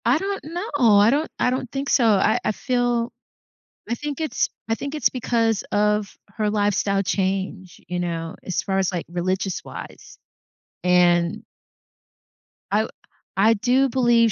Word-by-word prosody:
I 240 +4 +4
don't 390 +1 -3
know, 350 +7 -4 0.3
I 205 +2 +6
don't 300 +4 0
I - - +3
don't 255 -1 -3
think 275 +1 -3
so. 245 - +4
I 215 -1 +4
I - - +1
feel 245 0 0 0.8
I 235 - 0
think 295 +3 -5
it's 310 -7 0 0.2
I 225 - +1
think 280 +5 -5
it's 300 - +3
because 230 -3 0
of 210 0 +1 0.2
her 215 -1 +1
lifestyle 205 -1 +1
change, 190 0 -2
you 180 0 -3
know, 165 -2 -3
as 185 - -2
far 195 -1 0
as, 190 -2 +1
like, 175 -3 -3
religious 185 +2 -2
wise. - - -10 0.7
And 175 -1 +3 1.3
I 205 - +3
w 220 - -4 0.5
I 215 +4 +5
do 255 +5 +2
believe 235 -2 +3
215 Hz, 155 wpm, -23 LUFS, 190-250 Hz, 1.3 s, I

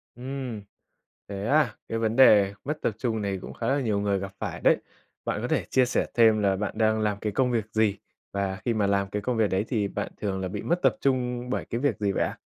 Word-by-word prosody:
Ừm, 125 -3 -5 0.7
thế 100 0 -5
à? 150 +4 +3
Cái 115 - -2
vấn 110 0 0
đề 105 -6 +6
mất 150 +3 -3
tập - - +1
trung 110 -2 -1
này 100 -1 -2
cũng - - -8
khá - - -4
là 140 +1 +2
nhiều 110 -5 0
người 100 -1 0
gặp 95 0 -5
phải - - -4
đấy. - - +5 0.5
Bạn - - -1
có - - -2
thể - - 0
chia 130 -1 +4
sẻ 125 - 0
thêm 110 -2 +5
là 100 -1 +2
bạn 100 +1 -3
đang 110 0 +2
làm 105 -1 0
cái 105 - -2
công 125 +3 +1
việc 115 -3 0
gì 110 -2 +2 0.3
và 100 -1 -1
khi 120 - +2
mà 105 -2 +1
làm 100 -1 +1
cái 105 +1 -3
công 120 +2 -1
việc 110 -2 +3
đấy 95 +3 0
thì 105 -6 0
bạn 105 +1 -4
thường 95 -2 -1
là 95 - -2
bị 90 - -5
mất 175 +1 0
tập - - +3
trung 125 -2 0
bởi - - -2
cái 115 - -3
việc 145 - +1
gì 100 -2 +1
vậy - - +1
ạ? - - -3
110 Hz, 260 wpm, -26 LUFS, 100-125 Hz, 0.7 s, đề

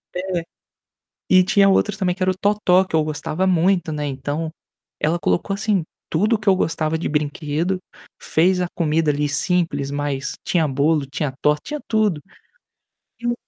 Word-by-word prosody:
é. 180 -1 -2 0.9
E 185 0 +6
tinha 195 +1 +4
outros, 205 +2 +2
também, 180 -3 0
que 185 - -2
era 185 - +3
o - - -4
totó, 200 -3 +3
que 185 - -3
eu 160 - +3
gostava 155 +3 -2
muito, 180 -1 +2
né, 150 -1 -3
então 145 +3 -3 0.5
ela 160 +3 +1
colocou, 195 +3 0
assim, 200 -2 0 0.3
tudo 210 +8 +2
o - - -3
que 215 - -13
eu 190 - +5
gostava 160 -3 0
de 165 - -3
brinquedo. 150 +4 -1 0.4
Fez 180 +3 +2
a 180 - 0
comida, 160 -2 +1
ali, 145 0 0
simples, 150 -1 0
mas 145 -1 -2
tinha 170 -3 +2
bolo, 145 +2 +1
tinha 135 0 -3
torta, 150 0 +2
tinha 300 0 -4
tudo. 210 -8 +1 1.0
E 240 - -3
o 240 - +2
165 Hz, 175 wpm, -21 LUFS, 150-190 Hz, 1.0 s, E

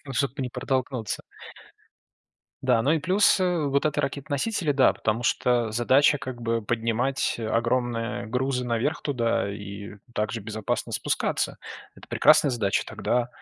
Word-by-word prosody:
ну, 135 - -6
чтобы 135 +1 -1
не 125 - -3
протолкнуться. 125 -3 -2 1.4
Да, 125 -3 +3
ну 140 +6 +3
и 160 - +3
плюс, 190 +4 +3
э, 175 -5 +1
вот 140 +1 +1
эта 150 -1 +1
ракеты-носители, 145 +5 -1
да, 135 -2 +4
потому 110 +2 -1
что 120 -1 +1
задача 130 +6 +4
как 125 -2 -7
бы 115 -1 -1
поднимать 115 +4 0
огромные 115 0 -1
грузы 125 +2 -1
наверх 120 +5 -1
туда, 115 -6 0
и, 100 0 -8
э, 105 - -17 0.2
так 105 0 -1
же 115 - -4
безопасно 110 0 -3
спускаться. - - -1 0.4
Это - - -16
прекрасная 150 -2 +5
задача. 110 -6 0
Тогда 120 0 -1
125 Hz, 150 wpm, -26 LUFS, 115-140 Hz, 1.4 s, прекрасная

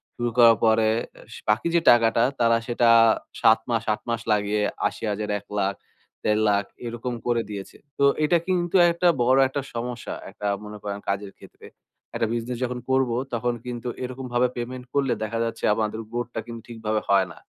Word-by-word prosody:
শুরু 120 -1 -1
করার 115 -2 +7
পরে 110 0 +4 0.6
বাকি 115 +10 +2
যে 170 - +6
টাকাটা 115 0 +5 0.2
তারা 115 -1 +4
সেটা 120 0 +2 0.5
৭ 110 - +6
মাস 115 -2 0
৮ - - -6
মাস 115 -1 -1
লাগিয়ে 105 0 +1 0.3
৮০,০০০, 105 -1 -4
১,০০,০০০, 100 -1 -2 0.5
১,৫০,০০০ 105 -1 +2 0.2
এরকম 120 +1 -4
করে 120 -1 +2
দিয়েছে। 100 -2 -7 0.2
তো - - +1 0.2
এটা 170 +3 +4
কিন্তু 175 -1 0 0.2
একটা 170 +1 +1 0.2
বড় 130 +2 +4
একটা 140 +1 -3
সমস্যা। 120 +1 -5 0.2
একটা 105 +1 -5 0.2
মনে 105 0 -8
করেন 100 -1 -4
একটা - - -23
কাজের 100 0 -4
ক্ষেত্রে। - - -15 0.5
একটা 115 - 0
বিজনেস 120 +1 -3
যখন 125 0 -2
করব, 130 -1 +2 0.2
তখন 120 +1 0
কিন্তু 120 -1 -5 0.2
এরকমভাবে 125 -1 -1
পেমেন্ট 125 +1 -5
করলে 140 -2 +2
দেখা 115 +2 -3
যাচ্ছে 115 - -5
আমাদের 110 0 -2
বোটটা 120 -1 -3
কিন্তু 115 -1 -8
ঠিকভাবে 110 -2 -2
হয় 100 -1 +4
না। - - -13
115 Hz, 170 wpm, -24 LUFS, 105-125 Hz, 0.6 s, করার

